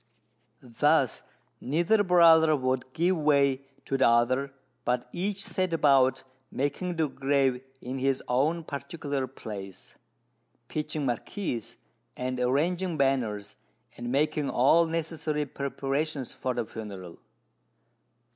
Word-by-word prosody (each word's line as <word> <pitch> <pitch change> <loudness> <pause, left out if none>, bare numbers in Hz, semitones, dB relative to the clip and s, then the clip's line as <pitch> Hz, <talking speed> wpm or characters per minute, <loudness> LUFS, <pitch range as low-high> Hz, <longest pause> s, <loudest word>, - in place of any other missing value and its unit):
Thus, 120 -3 +2 0.4
neither 175 - +2
brother 165 -4 +6
would 130 -1 -1
give 175 +6 +1
way 140 -3 +3 0.2
to 135 - -1
the - - +5
other, 125 +4 +2 0.3
but 125 0 -1
each 195 +2 -2
set 185 -2 -1
about 130 -4 +3 0.3
making 170 +6 -2
the 160 -2 +1
grave 135 -2 +1 0.2
in 130 +2 -5
his 135 0 0
own 150 +7 +1
particular 140 -2 -4
place, 100 -7 -8 0.8
pitching 150 -1 -2
marquees, 120 - -3 0.4
and 130 0 -3
arranging 165 +7 0
banners, 125 -7 0 0.4
and 120 0 -5
making 150 +1 +1
all 160 +7 +4
necessary 160 -2 -2
preparations 140 0 -3
for 130 -1 -3
the 120 - -1
funeral. 100 -6 -9
140 Hz, 110 wpm, -28 LUFS, 125-160 Hz, 0.8 s, brother